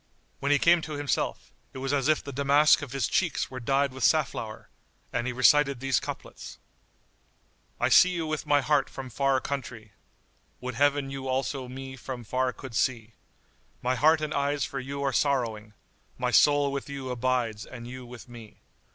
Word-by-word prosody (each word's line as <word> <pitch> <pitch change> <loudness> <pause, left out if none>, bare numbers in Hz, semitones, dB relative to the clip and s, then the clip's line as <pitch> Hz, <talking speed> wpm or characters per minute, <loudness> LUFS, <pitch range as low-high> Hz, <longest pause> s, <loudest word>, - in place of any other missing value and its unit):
When 140 - 0
he 145 - +5
came 170 +3 +4
to 155 - -6
himself, 145 -3 -2 0.2
it - - -8
was 135 +1 -2
as 140 -1 +1
if 155 0 +2
the 140 - -7
damask 140 +3 +4
of 145 -4 -7
his 135 -4 0
cheeks 175 -7 0
were 130 - -6
dyed 135 +2 +1
with 130 -1 -6
safflower,[FN#83] 115 -8 0 0.5
and 125 0 -1
he - - -1
recited 140 +2 +4
these 135 -2 +1
couplets:— - - -8 1.2
I - - +2
see 185 - +7
you 170 -3 -2
with 155 -1 -3
my 145 -1 +4
heart 145 -1 +1
from 130 -2 -8
far 135 +2 +2
countrie 120 -6 -6 0.3
* 75 +4 -40
Would 125 0 -5
Heaven 140 +1 +1
you 135 -1 -5
also 130 0 -2
me 130 +1 -8
from 125 0 -7
far 130 +3 0
could 130 -1 -10
see 115 -1 -1 0.7
My 125 +1 +1
heart 155 +4 +4
and 155 0 -2
eyes 140 -1 0
for 140 -1 -5
you 140 +2 -5
are 135 -1 0
sorrowing; 115 -7 0 0.2
* - - -39
My - - -1
soul 145 -1 +4
with 140 0 -5
you 135 -2 -5
abides 120 -3 -1
and 120 -1 -9
you 130 +1 -8
with 120 0 -11
me. 115 -3 -12
135 Hz, 190 wpm, -27 LUFS, 125-145 Hz, 1.2 s, see